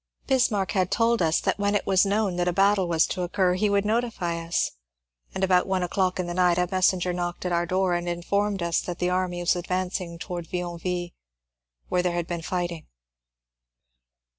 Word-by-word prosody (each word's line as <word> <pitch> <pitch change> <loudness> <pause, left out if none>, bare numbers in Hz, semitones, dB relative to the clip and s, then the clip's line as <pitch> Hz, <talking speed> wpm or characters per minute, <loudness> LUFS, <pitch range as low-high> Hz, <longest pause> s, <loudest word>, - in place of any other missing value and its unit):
Bismarck 225 -8 +1
had 185 -2 +1
told 230 -2 +2
us 160 -1 +2
that - - -1
when 205 0 +1
it 205 - 0
was 190 +1 +3
known 200 -2 +1
that 175 0 0
a - - +3
battle 195 0 +3
was 165 -2 +3
to 185 - -4
occur 180 +1 +1
he 205 +3 +1
would 200 0 +2
notify 210 -7 -1
us, 165 +1 0 0.6
and 190 - -2
about 185 -1 +3
one 190 -1 0
o'clock 185 +1 0
in 180 - 0
the 175 - -4
night 180 -1 +3
a 180 0 +2
messenger 185 -1 +2
knocked 175 0 -4
at 180 - -1
our 170 0 +1
door 185 0 +1
and 175 0 -1
informed 195 +3 -1
us 170 -1 +1
that 175 -1 -5
the 180 0 0
army 180 -1 -1
was 175 - +2
ad 175 0 -5
vancing 180 -2 -2
towards 175 -2 -5
Yionville, 175 0 -3 0.8
where 180 - +2
there 180 -1 0
had 175 -1 -1
been 170 -1 -4
fighting. 175 -1 -3
180 Hz, 200 wpm, -25 LUFS, 175-195 Hz, 0.8 s, was